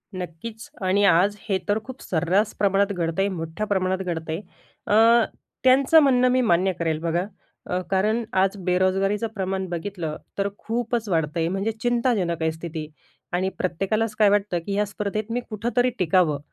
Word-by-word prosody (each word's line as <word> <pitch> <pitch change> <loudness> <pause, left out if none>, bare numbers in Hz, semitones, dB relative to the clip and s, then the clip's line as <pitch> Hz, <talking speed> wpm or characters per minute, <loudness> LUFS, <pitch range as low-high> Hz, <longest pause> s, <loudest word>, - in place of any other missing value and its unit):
नक्कीच 185 +5 -7 0.2
आणि 195 +2 +3
आज 195 +3 +4
हे 195 - +3
तर 205 +1 +2
खूप 260 +2 -10
सर्रास 185 +5 +1
प्रमाणात 200 0 +2
घडत 170 -1 -2
आहे, 195 - +3
मोठ्या 165 +2 -4
प्रमाणात 190 -2 +1
घडत 165 -2 -4
आहे. 160 +4 -2 0.5
अ, 225 +2 +5 0.4
त्यांचं 270 +5 +6
म्हणणं 255 -2 +4
मी 255 0 +3
मान्य 190 -4 +3
करेल 160 -2 0
बघा. 170 +2 0 0.5
अ, 180 - 0
कारण 215 +5 +2 0.2
आज 195 +1 +1
बेरोजगारीचं 190 +4 +1
प्रमाण 190 -1 -2
बघितलं, 175 -2 -4 0.2
तर 200 0 +1
खूपच 230 -1 -2
वाढतंय, 165 -1 0
म्हणजे 195 +5 -1
चिंताजनक 235 -9 +1
आहे 160 0 +1
स्थिती 160 -1 -6 0.5
आणि 185 +2 +1
प्रत्येकालाच 200 +5 -1
काय 210 -2 +6
वाटतं, 200 -3 +1
की 200 - -3
या 205 +1 +1
स्पर्धेत 210 +2 -4
मी 240 - 0
कुठेतरी 240 +3 0
टिकावं, 170 -4 +2
195 Hz, 160 wpm, -24 LUFS, 175-215 Hz, 0.5 s, त्यांचं